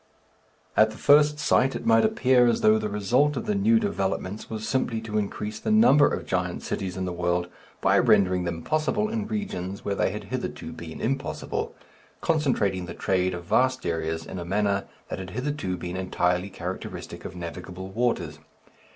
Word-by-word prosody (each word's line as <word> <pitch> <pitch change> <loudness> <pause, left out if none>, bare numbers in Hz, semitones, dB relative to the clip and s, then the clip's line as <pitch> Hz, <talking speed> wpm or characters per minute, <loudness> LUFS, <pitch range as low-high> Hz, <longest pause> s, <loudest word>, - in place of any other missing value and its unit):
At 110 0 +6
the 110 - -10
first 150 +1 +5
sight 135 -2 +2
it - - -5
might 115 0 +5
appear 125 +2 +4
as 120 - +2
though 110 0 +5
the 105 0 -2
result 125 +8 +2
of - - -3
the 210 - 0
new 220 +3 +4
developments 100 - -2
was 110 -1 -4
simply 125 -4 0
to 110 -1 -1
increase 105 +1 -4
the - - -3
number 215 -10 +6
of - - -3
giant - - -2
cities 95 -1 -3
in 95 - -2
the 90 - -3
world 90 0 0 0.3
by - - +4
rendering 90 -2 +4
them 85 -1 -4
possible 155 +8 0
in 220 -1 -2
regions 100 - -4
where 100 - 0
they - - +1
had - - -5
hitherto 80 - -4
been 80 0 -8
impossible 135 +4 -3 0.4
concentrating 110 - +1
the 85 - -7
trade 95 -1 0
of 85 - -7
vast 130 +6 +2
areas 80 -1 -2
in 95 - -6
a - - -4
manner 100 +2 0 0.2
that - - -4
had 95 -1 -6
hitherto 125 -3 -3
been 90 +1 -5
entirely 90 0 0
characteristic 95 - -6
of 90 - -7
navigable 90 +2 -7
waters. 95 -9 -1
105 Hz, 180 wpm, -26 LUFS, 90-130 Hz, 0.4 s, At